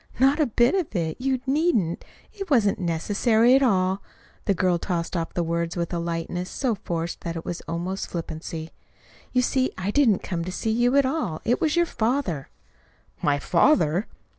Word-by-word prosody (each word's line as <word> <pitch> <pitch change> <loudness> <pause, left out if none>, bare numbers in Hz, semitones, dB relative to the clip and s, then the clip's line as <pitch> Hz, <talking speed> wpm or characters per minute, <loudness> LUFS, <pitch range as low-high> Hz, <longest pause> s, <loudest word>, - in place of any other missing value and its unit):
"Not 270 +4 +4
a 300 - +3
bit 240 +2 +3
of 365 - -1
it! 165 +3 -2
You 260 -1 0
needn't. 265 - +1 0.3
It 390 -2 -7
wasn't 220 -9 +3
necessary 210 +7 +2
at 270 - +4
all." 190 -5 +2 0.4
The 200 - +2
girl 180 -1 +2
tossed 170 -1 -2
off 165 -1 -3
the 175 - +1
words 170 +1 -2
with 170 +1 -2
a 170 - 0
lightness 170 +2 -3
so 255 -4 -1
forced 170 -3 -4
that 170 0 -4
it 165 - -6
was 175 - -4
almost 175 +3 -3
flippancy. 160 -1 -5 0.6
"You 250 0 +2
see, 260 +1 +1
I 185 +2 -2
didn't 225 -7 +3
come 170 -2 -3
to 185 - -5
see 220 +4 -2
you 240 +3 +2
at 280 -1 +5
all. 260 - -1
It 245 - +1
was 310 0 +2
your 345 0 +4
father." 230 - -1 0.7
"My 145 -1 +2
father!" 170 - +3
190 Hz, 185 wpm, -25 LUFS, 170-255 Hz, 0.7 s, at